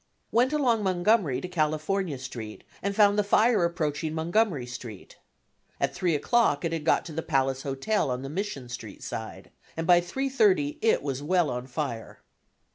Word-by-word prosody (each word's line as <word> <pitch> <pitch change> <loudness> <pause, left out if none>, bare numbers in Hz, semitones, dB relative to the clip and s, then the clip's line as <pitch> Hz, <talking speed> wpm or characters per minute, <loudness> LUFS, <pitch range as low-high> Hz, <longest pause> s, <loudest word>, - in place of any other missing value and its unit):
Went 245 +4 +3
along 255 -7 +2
Montgomery 185 - +2
to - - -5
California 155 0 -1
Street, 120 -4 -8 0.2
and 200 0 -2
found 205 0 +5
the - - +3
fire 215 0 +3
approaching 160 -2 -1
Montgomery 170 - +1
Street. 120 -4 -9 0.6
At - - 0
3 175 -4 0
o'clock 170 - +2
it 165 - -1
had 165 -2 -3
got - - +3
to 170 - -7
the 165 - -2
Palace 135 -2 0
Hotel 140 +7 -1
on 125 +1 -3
the - - -5
Mission 155 -5 -4
Street 115 -5 -8
side, - - -7 0.3
and 165 - -2
by 175 0 +6
3:30 205 - +1
it 225 -8 +2
was 135 -2 -3
well 175 +1 +1
on 125 +1 -4
fire. 125 -4 -5
165 Hz, 170 wpm, -27 LUFS, 135-200 Hz, 0.6 s, by